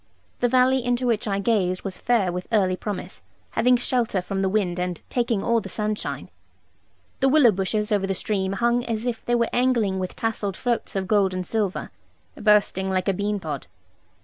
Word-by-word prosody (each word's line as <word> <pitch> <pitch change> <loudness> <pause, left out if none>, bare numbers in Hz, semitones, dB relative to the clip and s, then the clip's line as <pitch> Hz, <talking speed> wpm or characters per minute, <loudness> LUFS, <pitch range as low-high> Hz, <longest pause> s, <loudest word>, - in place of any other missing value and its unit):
The 245 - +3
valley 255 +1 +3
into 245 +1 0
which 230 -3 0
I 195 -1 0
gazed 195 -4 0
was 195 -2 -5
fair 225 -7 +2
with 180 +1 -5
early 190 -4 +3
promise, 205 0 -5 0.3
having 250 +1 +3
shelter 240 -4 0
from 195 +2 -3
the 190 - +1
wind 185 -3 0
and 180 -2 -2
taking 235 -5 0
all 235 -1 +2
the 195 - -8
sunshine. 210 0 -3 0.9
The 270 - +3
willow 270 -5 +6
bushes 210 +3 -1
over 200 -2 +1
the 195 - -1
stream 195 -1 -1
hung 235 +4 +1
as 230 0 -2
if 235 -2 -3
they 240 - +1
were 235 -1 +1
angling 235 -7 +2
with 185 -1 -4
tasseled 210 -4 -2
floats 240 -4 -2
of 190 -1 -1
gold 195 -2 +2
and 185 0 -3
silver, 205 -1 -2 0.4
bursting 210 -3 +2
like 185 -1 0
a 195 - +3
bean 205 +2 -1
pod. 150 - -5
210 Hz, 190 wpm, -24 LUFS, 190-235 Hz, 0.9 s, willow